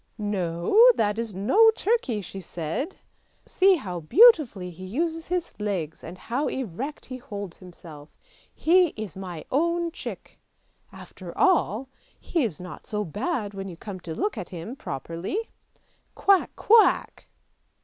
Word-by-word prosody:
" - - -43 0.2
No, 170 - -2 0.2
that 210 0 0
is 225 -4 -4
no 400 - +5
turkey," 380 - 0
she 195 0 -8
said; 175 - -4 0.3
" - - -41
see 380 +1 +4
how 185 - -5
beautifully 245 - +5
he 180 +2 -11
uses 320 - -2
his 360 -1 -2
legs 185 -7 -3
and 175 +3 -8
how 250 +9 -2
erect 265 - -5
he 255 - -7
holds 205 -7 -7
himself: 165 -5 -13 0.4
he 350 0 +3
is 215 -6 -6
my 180 -4 -7
own 335 +4 +1
chick! 355 - -8 0.5
after - - -11
all, 270 - +2 0.3
he 330 -5 -1
is 200 -11 -3
not 180 -2 -10
so 210 -1 -2
bad 210 - -3
when 195 0 -6
you 175 -3 -9
come 195 0 -7
to 165 -2 -7
look 210 - -2
at 180 - -7
him 185 +8 -7
properly. 170 - -5 0.8
Quack, 395 -2 +3
quack! 450 -1 +3
210 Hz, 150 wpm, -25 LUFS, -, 0.8 s, no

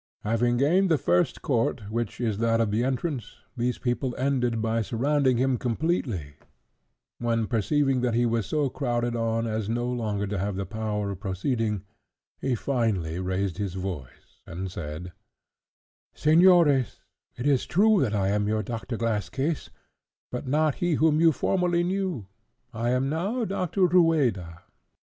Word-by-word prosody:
Having 120 +2 +1
gained 175 +9 +3
the 160 - +4
first 90 -7 +1
court, 120 -4 0
which 115 -1 -3
is 110 -4 -1
that 115 0 +2
of 115 -3 +1
the 110 +3 +1
entrance, 130 - -2 0.2
these 125 0 -1
people 125 +1 -2
ended 125 -4 0
by 115 +1 0
surrounding 130 +3 +1
him 130 -1 +1
completely; 120 - -1 0.9
when, 115 -1 0
perceiving 130 +5 +1
that 120 -2 0
he 120 +1 +3
was 115 -4 0
so 150 +4 +1
crowded 120 -3 -1
on 115 0 0
as 110 -2 -2
no 120 +1 -1
longer 110 -5 -2
to 100 -1 -3
have 100 +1 -2
the 100 0 -3
power 105 0 -3
of 95 - -7
proceeding, 105 +1 -2 0.6
he 130 -2 0
finally 110 -10 -1
raised 95 0 -2
his 100 -3 -3
voice, 90 -9 -7
and 90 +2 -5
said— 85 +2 -6 1.0
"Señores, 155 -4 +4 0.4
it 120 - -4
is 140 -3 +2
true 210 +3 +4
that 110 -5 0
I 95 -1 +1
am 105 0 +1 0.2
Doctor 115 +2 -5
Glass 105 -5 -1
case, 145 - -2 0.6
but 125 +2 -5
not 150 +2 +2
he 175 -3 +2
whom 155 0 +3
you 165 -1 +6
formerly 175 +2 +1
knew. 185 - -2 0.5
I 115 +1 -1
am 125 +2 +1
now 195 - -1
Doctor 185 -1 0
Rueda. 140 - +2
120 Hz, 155 wpm, -26 LUFS, 105-145 Hz, 1.0 s, you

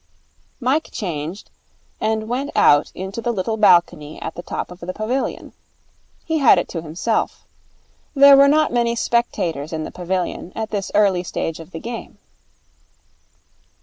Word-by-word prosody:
Mike 275 +5 0
changed, 170 -1 -5 0.5
and 220 0 -1
went 260 +5 -2
out 145 +1 +4
into 190 +5 -5
the 240 - -1
little 220 +1 -2
balcony 175 -7 +3
at - - -5
the 175 - -7
top 175 - -5
of 180 - -11
the 185 +1 -5
pavilion. 245 +7 -3 0.7
He 320 -1 0
had 275 - +6
it - - 0
to 165 - -4
himself. 170 +8 -2 0.7
There 280 0 +8
were 275 +1 +7
not 305 0 +3
many 235 -1 +1
spectators 170 - -1
in 160 -1 -3
the - - -7
pavilion 180 0 -3
at 220 0 -4
this 200 -2 -3
early 200 -4 +3
stage 165 -2 -4
of 165 - -11
the 165 - -7
game. 235 +3 -7
200 Hz, 150 wpm, -20 LUFS, 175-235 Hz, 0.7 s, There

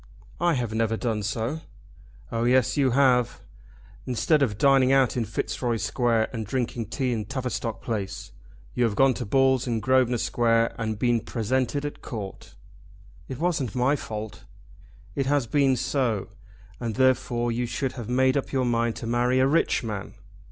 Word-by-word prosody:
"I 175 -1 +2
have 120 -4 -2
never 115 0 0
done 110 -3 -1
so." 115 +9 -2 0.7
"Oh 115 0 -1
yes, 125 0 +3
you 140 -3 +3
have. 125 -2 +3 0.7
Instead 145 +5 +2
of 110 -7 +1
dining 135 +1 +4
out 135 -2 +3
in 120 -2 0
Fitzroy 115 +2 -2
Square 115 -1 +1
and 115 -2 -3
drinking 120 0 -3
tea 130 +1 -1
in 110 -2 -3
Tavistock 125 -4 -4
Place, 105 -5 -4 0.4
you 125 - +1
have 115 -3 +1
gone 135 +2 +4
to 125 -2 -5
balls 130 +2 +3
in 115 -2 0
Grosvenor 130 0 +2
Square 115 0 +1
and 110 -1 -2
been 120 +1 +2
presented 130 +5 -1
at 145 - -6
Court." 100 - -8 0.7
"It 130 - -6
wasn't 150 - -1
my 130 +3 +2
fault." 110 -5 -7 0.7
"It 135 -1 -1
has 145 -2 +2
been 135 +2 +2
so, 120 -6 -1 0.5
and 115 -3 -3
therefore 125 -2 +2
you 120 +1 -1
should 125 +3 -2
have 120 -3 -7
made 130 +1 +3
up 140 - -2
your 130 -2 +1
mind 115 -1 0
to - - -7
marry 120 +2 +1
a 130 - +4
rich 145 -1 +2
man." 105 -2 -5
120 Hz, 165 wpm, -25 LUFS, 115-130 Hz, 0.7 s, dining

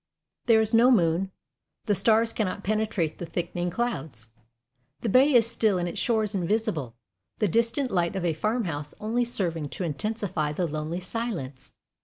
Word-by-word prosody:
There 225 -2 +6
is 220 +1 -1
no 235 +2 +6
moon. 180 -4 +3 0.6
The 210 - +2
stars 220 +3 +3
cannot 200 -2 -2
penetrate 210 -6 -1
the 175 - -4
thickening 175 +1 -3
clouds. 150 - -3 0.7
The 230 - -1
bay 265 +7 +5
is 230 -2 +6
still 220 -4 +1
and 175 0 -1
its 170 - -4
shores 220 -3 +1
invisible, 185 - -1 0.4
the 210 - +2
distant 230 - +1
light 175 0 0
of 190 -2 -2
a 165 - +1
farmhouse 165 -6 -2
only 230 +3 0
serving 170 -10 -2
to 185 - -5
intensify 175 -2 -2
the 175 +3 -1
lonely 155 +3 -3
silence. 180 - -5
195 Hz, 160 wpm, -26 LUFS, 165-225 Hz, 0.7 s, There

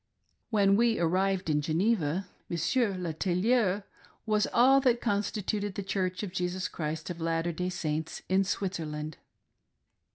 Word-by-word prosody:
When 200 -3 +4
we 230 0 +3
arrived 185 +2 +1
in 150 -1 +2
Geneva, 170 +2 +1 0.2
Monsieur 205 +5 +1
le 175 -3 -3
tailleur 195 +4 +1 0.4
was 215 -1 +2
all 265 +3 +6
that 245 -3 +3
constituted 205 -2 -1
the 200 - -3
Church 185 -1 -2
of 200 - -4
Jesus 180 0 -1
Christ 155 +1 -4
of 170 -1 -7
Latter 165 +1 0
Day 180 +2 -2
Saints 155 -3 -3
in 190 +1 +3
Switzerland. 155 -6 -3
185 Hz, 135 wpm, -29 LUFS, 165-205 Hz, 0.4 s, all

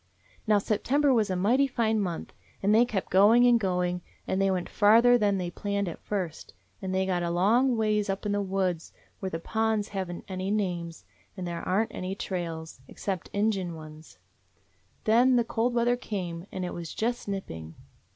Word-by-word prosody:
"Now 210 -1 +5
September 265 +8 +2
was 220 -4 +2
a 185 - 0
mighty 240 +10 +3
fine 225 -4 +1
month, 180 -5 -3 0.3
and 205 +2 +4
they 230 +3 +6
kept 205 -6 -3
going 215 +6 +6
and 240 -1 +5
going, 180 -3 -1 0.2
and 190 - -1
they 195 - +3
went 185 -2 -1
farther 230 +4 +5
than 205 -4 +2
they 180 -2 -3
planned 200 +1 -2
at 170 - -6
first, 185 -6 -4 0.3
and 190 - -3
they 190 0 +1
got 180 -2 0
a 170 - -1
long 225 +9 +3
ways 215 -2 +1
up 195 +2 -3
in 205 - 0
the 205 0 +1
woods, 185 -4 -2 0.3
where 190 - -3
the 165 - -3
ponds 220 +4 -1
have 190 -3 -3
n't 175 - -7
any 185 0 -3
names, 175 -5 -2 0.3
and 185 - -4
there 170 -1 -4
are 195 +4 +1
n't - - -9
any 185 +1 -4
trails, 165 -7 -5
except 190 -4 -4
Indian 200 -5 0
ones. 155 0 -12 0.9
Then 245 +4 +4
the 240 - +4
cold 235 +1 -1
weather 240 +1 +3
came, 185 -7 -5
and 185 -1 -3
it 180 - -4
was 170 -2 -7
just 240 +1 -2
nipping. 80 - -6
195 Hz, 190 wpm, -28 LUFS, 180-220 Hz, 0.9 s, they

